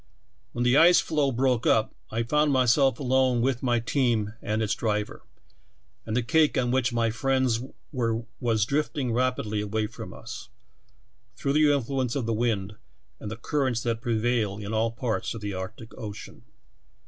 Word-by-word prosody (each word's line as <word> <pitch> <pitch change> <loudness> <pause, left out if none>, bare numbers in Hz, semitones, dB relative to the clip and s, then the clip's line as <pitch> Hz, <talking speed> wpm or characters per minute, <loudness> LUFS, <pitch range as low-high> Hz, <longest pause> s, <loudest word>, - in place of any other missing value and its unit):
When 120 - -1
the 125 +3 +4
ice 175 +3 +7
floe 145 -3 +1
broke 125 -1 +1
up 110 0 +3 0.2
I 115 +1 -1
found 150 +5 +2
myself 130 0 +3
alone 130 -2 +2
with 125 0 0
my 120 -2 +2
team 115 -4 0
and 110 +1 -1
its 105 - 0
driver, 105 -2 -2 0.9
and 110 - -1
the 125 - +1
cake 155 +6 +3
on 125 -2 +1
which 130 -1 +1
my 115 -1 +1
friends 130 -1 +1 0.3
were 115 -4 -1 0.2
was 110 -4 +1
drifting 140 -1 -1
rapidly 115 -4 0
away 105 +1 -1
from - - -8
us, - - -9 0.9
through 140 - -1
the 150 0 +5
influence 135 -2 -1
of 135 -5 -1
the 115 - 0
wind 105 -3 -1 0.4
and 105 - -6
the 110 - -6
currents 130 -2 -1
that 115 -1 -1
prevail 115 -3 0
in 105 +1 -5
all 110 +1 +2
parts 115 0 -3
of 115 - -7
the 105 -1 -4
Arctic 105 +5 -7
ocean. 105 -4 -9
120 Hz, 170 wpm, -26 LUFS, 110-130 Hz, 0.9 s, ice